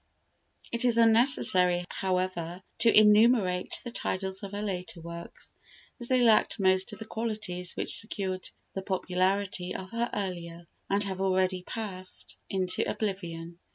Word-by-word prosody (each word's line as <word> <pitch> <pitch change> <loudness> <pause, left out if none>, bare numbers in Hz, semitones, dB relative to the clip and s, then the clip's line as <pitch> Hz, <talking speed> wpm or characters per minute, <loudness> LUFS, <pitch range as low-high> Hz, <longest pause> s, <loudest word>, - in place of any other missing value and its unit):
It 235 +1 +1
is 240 -2 +4
unnecessary, 220 -7 +5
however, 185 -2 -2 0.2
to 230 - +5
enumerate 210 -3 +4
the 240 - -6
titles 190 -3 -2
of 200 -2 -7
her 205 +1 -3
later 185 -3 -4
works, 170 +1 -9 0.5
as 240 - -1
they 255 0 +3
lacked 225 -1 +4
most 190 -1 +3
of 210 - -8
the 220 - -8
qualities 210 -6 -2
which - - -2
secured 190 -4 -4 0.2
the 195 - -3
popularity 185 0 -1
of 190 0 -7
her 235 +1 -1
earlier, 175 -3 -5 0.2
and 200 +1 +2
have 190 -1 -3
already 185 -1 +1
passed 185 -2 -5
into 185 -1 0
oblivion. 170 -5 -4
190 Hz, 140 wpm, -28 LUFS, 180-215 Hz, 0.5 s, unnecessary